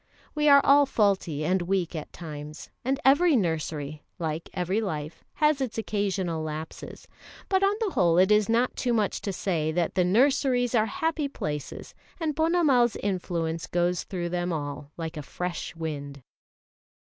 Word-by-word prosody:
We 300 -1 +3
are 280 0 +8
all 280 0 +6
faulty 190 - +1
and 185 +2 +2
weak 180 -1 -1
at 155 - -6
times, 150 -2 -8
and 270 +2 0
every 290 +4 +5
nursery, 155 - -2 0.2
like 160 -1 -4
every 185 +4 -1
life, 160 -5 -5
has 300 -2 +2
its 250 -4 -3
occasional 195 -6 -1
lapses; 155 0 -7 0.4
but 380 -1 +3
on 395 +1 +3
the 440 -4 -1
whole 170 - +3
it 185 +3 +5
is 210 0 +4
not 235 +2 +2
too 245 -2 0
much 215 -3 0
to 200 - -3
say 165 -5 -1
that 170 -1 0
the 185 - +2
nurseries 245 +4 +2
are 220 -2 +3
happy 325 -3 -1
places, 150 - -5 0.3
and 315 -3 -1
Ponnamal's 315 -8 +3
influence 170 -4 -2
goes 175 0 0
through 175 -2 -4
them 175 0 -1
all 145 -2 -5
like 165 -1 -5
a - - -3
fresh 175 +5 -5
wind. 145 -4 -6
185 Hz, 160 wpm, -27 LUFS, 160-250 Hz, 0.4 s, are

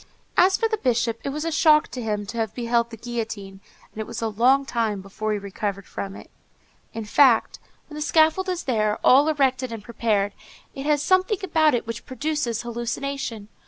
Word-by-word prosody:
As 375 +1 +5
for 450 - +1
the 440 -1 -2
Bishop, 235 - 0
it - - -2
was 300 +3 -4
a 330 - -1
shock 310 -3 +4
to 250 - -6
him 210 -2 -2
to 230 +3 -7
have 220 -1 -2
beheld 235 -1 0
the 225 - -9
guillotine, 220 -4 -5 0.3
and 220 - -6
it 215 - -6
was - - -6
a 225 - -1
long 255 +6 +3
time 225 -5 -1
before 200 +3 -4
he 210 - 0
recovered 200 0 -4
from 195 0 -6
it. - - -12 0.6
In 225 -1 -6
fact, 235 +1 +4 0.3
when - - -13
the 300 - -6
scaffold 320 +5 +3
is 360 -1 -2
there, 215 -4 0
all 275 +4 +6
erected 260 -4 +1
and 225 -2 -7
prepared, 210 -3 0 0.4
it 275 +2 -6
has 295 -1 +2
something 375 +5 +2
about 315 -5 +3
it 240 - -2
which 230 0 -6
produces 260 -4 -2
hallucination. 235 -1 -4
240 Hz, 195 wpm, -24 LUFS, 220-295 Hz, 0.6 s, all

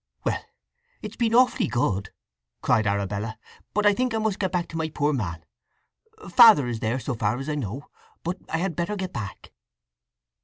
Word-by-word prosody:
"Well—it's 485 +1 -7
been 230 -2 +1
awfully 255 +1 +4
good," 100 -5 0 0.5
cried 110 -1 +3
Arabella. 100 +2 -2 0.3
"But 210 +1 0
I 205 - +6
think 250 +1 0
I - - +1
must 215 -3 -1
get 190 -2 0
back 180 -2 -1
to - - -9
my 160 -1 -1
poor 150 0 0
man. 85 - -3 0.8
Father 225 - +8
is 120 -2 -3
there, 110 +3 -1
so 135 - -3
far 110 0 0
as 135 +2 -6
I 155 - -1
know; 135 -1 -4 0.4
but 175 +3 -2
I 160 - 0
had 175 -1 -2
better 175 +6 -2
get 190 -2 -4
back." 100 -4 -7
150 Hz, 180 wpm, -25 LUFS, -, 0.8 s, Father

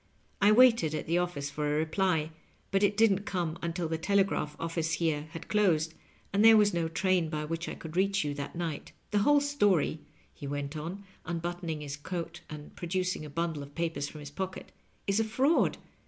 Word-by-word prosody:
I 205 +2 +6
waited 230 -9 +5
at - - -3
the 170 +2 +2
office 145 -5 -2
for 150 +1 -2
a 150 0 +1
reply, 160 0 +1 0.4
but 195 0 +2
it 205 0 +2
didn't 215 -4 +5
come 170 -4 -2
until 170 0 -2
the 160 0 -2
tele 200 +3 +3
graph 150 -6 -3
office 165 -1 -2
here 155 -2 0
had 165 - -7
closed, 170 -7 +2 0.4
and 200 +2 +3
there 225 0 +9
wad 205 -1 +4
no 170 -1 0
train 180 0 +1
by 150 -1 -3
which 165 +2 -3
I - - -5
could 160 0 -9
reach 195 +1 +2
you 145 -1 -2
that 140 +2 -6
night. 165 -4 -4 0.2
The 210 - +3
wbole 290 +7 +4
story," 205 - +2 0.3
he 140 - -8
went 145 +1 -4
on, 170 +6 -5 0.3
imbuttoning 170 -2 -3
his 145 -1 -5
coat 170 +2 -5
and 150 -1 -9
producing 180 -2 -2
a - - -8
bundle 160 0 -2
of 140 0 -11
papers 165 -4 -2
from 155 - -10
his 145 -1 -8
pocket, 190 +4 -5 0.2
" - - -38
is 200 +2 +1
a - - +3
fraud. 260 +9 +2
170 Hz, 205 wpm, -30 LUFS, 155-195 Hz, 0.4 s, there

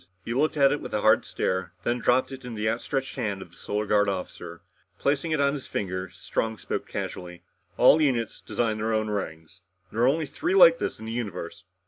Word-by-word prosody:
He 115 - -2
looked 150 +4 +1
at 140 -1 +5
it 145 - -1
with - - -5
a - - 0
hard - - +4
stare, 95 -1 -2
then 120 +4 0
dropped 125 +3 +2
it 135 0 -8
in 120 -2 -6
the 110 0 -1
outstretched 130 +5 -2
hand 105 -6 -2
of 90 -3 -10
the - - -18
Solar 105 +1 -3
Guard 105 -1 +3
officer. 90 -2 -6 0.4
Replacing 140 +3 0
it 155 -1 +1
on 140 0 +3
his 140 -3 -6
finger, 95 -2 -3
Strong 110 +4 -3
spoke - - -4
casually. 90 -1 -6 0.3
"All 155 - +7
units 125 -6 0
design 110 -2 -1
their 110 +1 0
own 110 -1 0
rings. 80 -3 -5 0.3
There 115 - -2
are 120 - +5
only 155 +4 +2
three 325 - -2
like - - +8
this - - -3
in 110 - -8
the 110 - -5
universe. 100 -8 -5
110 Hz, 215 wpm, -26 LUFS, 95-135 Hz, 0.4 s, like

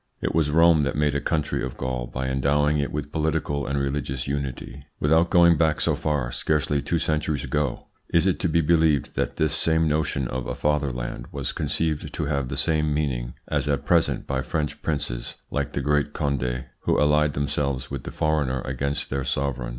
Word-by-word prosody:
It - - -2
was 80 -2 +2
Rome 80 0 +5
that 70 - -1
made 75 -1 +2
a 70 - -1
country 75 -5 -1
of 65 -1 -5
Gaul 65 -1 -3
by 65 +2 -4
endowing 75 +3 +2
it 70 - -1
with 75 0 -4
political 75 -3 -1
and 70 - -1
religious 70 -1 -2
unity. 70 -1 -4 0.2
Without 80 +3 +3
going 85 -2 +6
back 80 -1 +2
so - - +2
far, 70 -6 -1
scarcely 75 0 0
two 85 - 0
centuries 75 -3 0
ago, 70 0 -1 0.2
is 85 +1 +3
it 95 - +1
to 90 - 0
be 85 +1 +3
believed 80 -3 +2
that - - -2
this - - +2
same 80 0 +3
notion 75 -4 0
of 65 +1 -4
a - - -3
fatherland 70 -5 -1
was - - -3
conceived 80 -2 -1
to - - -2
have 70 -3 -1
the 70 - -4
same 75 +1 +1
meaning 65 -5 -1
as - - -1
at 70 -1 0
present 85 +1 +2
by 65 -1 -1
French 75 +1 -3
princes 70 -6 -3 0.2
like - - -2
the - - -1
great 75 0 +1
Conde, 65 -4 -1
who - - +1
allied 75 0 +3
themselves 70 -2 -2
with 70 -3 -4
the - - -6
foreigner 75 -5 0
against 70 +3 -3
their 70 0 -1
sovereign? 65 -1 -2
75 Hz, 195 wpm, -25 LUFS, 65-75 Hz, 0.2 s, going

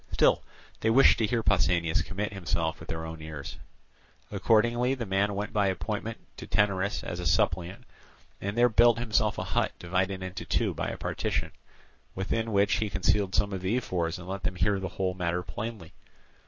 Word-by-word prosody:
Still, - - +4 0.4
they 110 - +1
wished 130 +5 +6
to 110 - +2
hear 115 +1 0
Pausanias 85 -5 +2
commit 100 +2 -4
himself 85 -4 -2
with - - -12
their 80 0 -3
own 80 -1 -7
ears. 75 -3 -7 0.7
Accordingly 120 +5 +2
the 120 -3 -4
man 100 +1 +1
went 105 +2 -3
by 105 -2 +2
appointment 105 +3 -3 0.2
to - - -8
Taenarus 100 -1 +1
as 85 - -5
a 90 - -2
suppliant, 85 +6 +1 0.6
and 100 +3 -3
there 120 +1 +6
built 120 0 +5
himself 110 -3 +1
a - - -2
hut - - 0
divided 95 +2 -1
into 95 0 -5
two - - 0
by - - -3
a - - -4
partition; - - -2 0.6
within 110 +4 -1
which 100 -1 +3
he 105 +1 -1
concealed 95 +3 +1
some 100 -1 +1
of 95 - -3
the 95 +6 +1
ephors 85 -8 -1
and 90 0 -10
let 95 +1 -4
them 90 +1 -2
hear 100 +2 +1
the 95 -1 -4
whole 90 +1 -1
matter 90 -1 -1
plainly. 105 -5 -6
100 Hz, 185 wpm, -28 LUFS, 90-110 Hz, 0.7 s, wished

